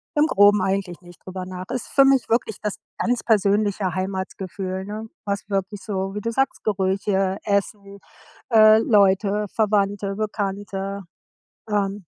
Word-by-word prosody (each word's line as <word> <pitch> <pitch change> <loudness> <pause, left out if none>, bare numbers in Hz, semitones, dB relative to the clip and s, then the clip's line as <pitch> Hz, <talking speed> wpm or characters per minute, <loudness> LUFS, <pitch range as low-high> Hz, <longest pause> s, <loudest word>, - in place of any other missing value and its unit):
im 300 +1 +4
Groben 205 -4 +5
eigentlich 190 -2 -2
nicht 175 -1 -16
drüber 185 0 -6
nach. 185 0 -7
Ist 250 - -4
für 275 - +4
mich 270 -2 +3
wirklich 225 -2 0
das 210 -1 -2 0.2
ganz 245 0 0
persönliche 205 -2 +1
Heimatsgefühl, 190 0 -4
ne? 215 +2 -6 0.2
Was 200 0 -3
wirklich 195 0 -2
so, 195 -2 -3
wie 210 - -3
du 230 - -2
sagst: 270 +3 -1
Gerüche, 195 -1 0
Essen, 200 0 -2 0.5
äh, 215 -1 +7
Leute, 205 -1 +3
Verwandte, 200 -2 0
Bekannte. 200 -2 -4 0.7
Ähm, 205 -1 -1
200 Hz, 140 wpm, -23 LUFS, 190-215 Hz, 0.7 s, äh